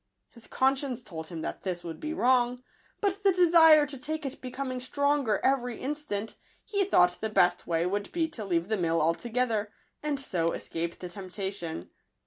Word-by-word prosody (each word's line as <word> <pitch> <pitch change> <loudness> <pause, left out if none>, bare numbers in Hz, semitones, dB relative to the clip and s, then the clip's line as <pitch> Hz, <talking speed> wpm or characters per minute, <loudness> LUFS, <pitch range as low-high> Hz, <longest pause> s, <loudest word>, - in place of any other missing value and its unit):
His 235 -2 -12
conscience 265 -2 0
told 160 -5 -7
him 165 -2 -6
that - - -4
this 180 -2 -3
would 165 -2 -7
be 310 - -4
wrong; 250 -3 +2 0.4
but 400 -1 0
the 395 - +6
desire 330 -4 +7
to 280 -2 -7
take 305 +3 -3
it 275 - -5
becoming 255 0 -4
stronger 280 -4 +1
every 250 -3 +1
in 280 +3 -2
stant, 225 -8 -4 0.3
he 405 -1 +1
thought 180 - +3
the 220 - -1
best 180 -4 +2
way 165 0 +1
would 200 +2 -2
be 330 -2 0
to 235 -8 -4
leave 175 -3 0
the 220 - +1
mill 165 -2 +1
altogether, 220 +6 0 0.3
and 295 -2 -1
so 170 -11 0
escape 170 +1 -4
the 180 - -7
temptation. 185 - -5
240 Hz, 180 wpm, -28 LUFS, 180-285 Hz, 0.4 s, desire